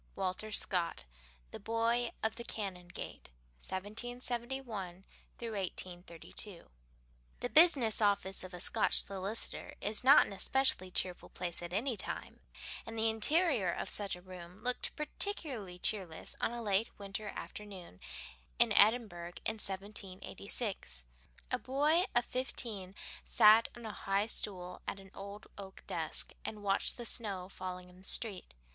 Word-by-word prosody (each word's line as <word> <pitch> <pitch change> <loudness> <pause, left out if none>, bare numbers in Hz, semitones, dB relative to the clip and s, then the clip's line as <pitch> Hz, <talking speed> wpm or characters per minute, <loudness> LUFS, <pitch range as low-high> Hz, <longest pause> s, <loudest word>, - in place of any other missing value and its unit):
XV - - -30
Walter 190 +3 -2
Scott 175 - 0 0.5
The - - -7
Boy 230 +2 +1
of 220 0 +1
the 235 - -6
Canongate: 185 -6 -6 0.3
1771 230 - -4 0.3
1832 185 -3 -4 0.7
The 245 - -2
business 275 -10 +7
office 200 -2 +2
of 185 - -8
a - - -7
Scotch - - +2
solicitor 195 +3 -4
is 210 +3 0
not 275 +3 +9
an - - -6
especially 195 -2 +3
cheerful 180 0 -1
place 175 -1 -3
at 175 0 -6
any 230 +7 0
time, - - -3 0.4
and 225 0 -7
the 225 0 +3
interior 240 - +4
of - - -3
such 200 -3 +1
a 180 - -13
room 180 0 -11
looked 250 0 -1
particularly 285 - -2
cheerless 180 -4 -2
on - - +2
a 240 0 -4
late 205 +1 +2
winter 200 +1 -4
afternoon 190 - -8 0.6
in - - +5
Edinburgh 205 -6 +4
in 220 0 0
1786. 195 - -3 0.5
A - - +1
boy 300 +7 +3
of 240 0 +4
fifteen 220 -7 -2 0.3
sat 215 +2 +7
on 235 - -9
a 220 - -3
high 195 +1 +1
stool 180 -5 -2
at - - -3
an 195 -1 -14
old 200 +1 -8
oak 190 -1 -9
desk, - - +1
and 210 -1 -5
watched 195 -1 +1
the 240 - -6
snow 200 -7 -3
falling 185 -1 -6
in 180 0 -17
the 185 - -16
street. 195 - +1
205 Hz, 140 wpm, -34 LUFS, 185-230 Hz, 0.7 s, not